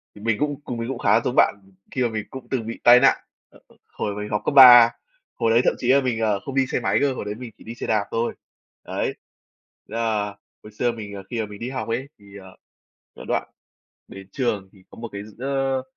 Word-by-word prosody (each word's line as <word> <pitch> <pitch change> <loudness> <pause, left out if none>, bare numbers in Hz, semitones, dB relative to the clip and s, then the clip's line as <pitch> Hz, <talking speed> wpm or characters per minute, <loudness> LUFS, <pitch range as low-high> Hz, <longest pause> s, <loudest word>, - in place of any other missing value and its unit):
thì 105 - -13
mình 110 -1 0
cũng 145 -1 -2
cùng 120 - -5
mình 115 +1 -4
cũng 135 -3 -4
khá - - +3
giống - - -2
bạn - - +4 0.4
khi 130 - -2
mà 120 - +1
mình 110 -2 -4
cũng 130 -1 -10
từng 115 -4 -2
bị 115 - -6
tai 120 +1 +8
nạn. 135 - +4 0.3
Ờ, - - -20 0.3
hồi 100 - -3
mình 105 0 -5
học 105 -1 -1
cấp - - 0
3, 120 -4 +10 0.4
hồi 115 -2 +1
đấy 115 +2 +5
thậm - - +3
chí 120 - -4
là 140 - +5
mình, 125 -4 -1
ờ, 105 -3 +1
không 135 +6 -8
đi 135 - +3
xe - - -1
máy - - +1
cơ, 140 -2 +2
hồi 125 - -6
đấy 105 0 -4
mình 120 -1 -9
chỉ - - -16
đi 115 - -8
xe - - -6
đạp 105 -2 +1
thôi, 115 +1 -1 0.5
đấy, - - -3 0.7
ờ, 110 -2 -1 0.4
hồi 105 - -12
xưa 120 +3 0
mình, 105 -3 -8
ờ, 95 - -8
khi 120 - -3
mà - - -2
mình 105 -1 -11
đi 120 - -4
học 130 -4 -4
ấy, 120 +4 -3
thì, 100 0 -14
ờ, 95 -1 -13 0.6
cái - - -10
đoạn - - -1 0.6
đến 95 -1 -11
trường 105 -7 -2
thì 95 - -20
có - - -14
một 115 - -6
cái, 100 - -6
s 110 +2 -16
ơ, 135 0 -1
115 Hz, 250 wpm, -23 LUFS, 105-130 Hz, 0.7 s, 3